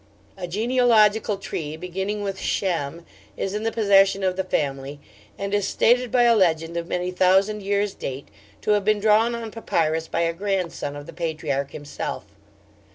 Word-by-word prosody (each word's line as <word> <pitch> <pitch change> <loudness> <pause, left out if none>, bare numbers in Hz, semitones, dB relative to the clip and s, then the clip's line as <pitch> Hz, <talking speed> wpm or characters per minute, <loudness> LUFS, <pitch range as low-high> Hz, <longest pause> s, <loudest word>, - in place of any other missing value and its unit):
A 180 - -6
genealogical 220 0 +3
tree 155 -5 -5
beginning 190 +4 -3
with 195 -1 -4
Shem 170 -3 -2 0.3
is 195 - -2
in 210 - -2
the 225 +1 -1
possession 195 -3 +4
of 185 -1 +1
the 190 - -1
family, 140 -4 -2 0.4
and 200 0 -4
is 205 -2 +1
stated 245 +1 +3
by 245 -1 +4
a 235 -1 +5
legend 165 -4 +1
of 170 0 -3
many 180 0 -2
thousand 190 +3 +3
years' 200 0 0
date 135 +1 -6 0.3
to - - 0
have 205 -1 +3
been 215 +1 +2
drawn 220 +3 +3
on 230 -2 -6
papyrus 160 -7 -1
by 165 - -1
a 165 0 +1
grandson 180 -6 -2
of 145 0 -8
the 170 - -10
patriarch 155 -4 -2
himself. 145 -1 -6
190 Hz, 170 wpm, -23 LUFS, 165-210 Hz, 0.4 s, a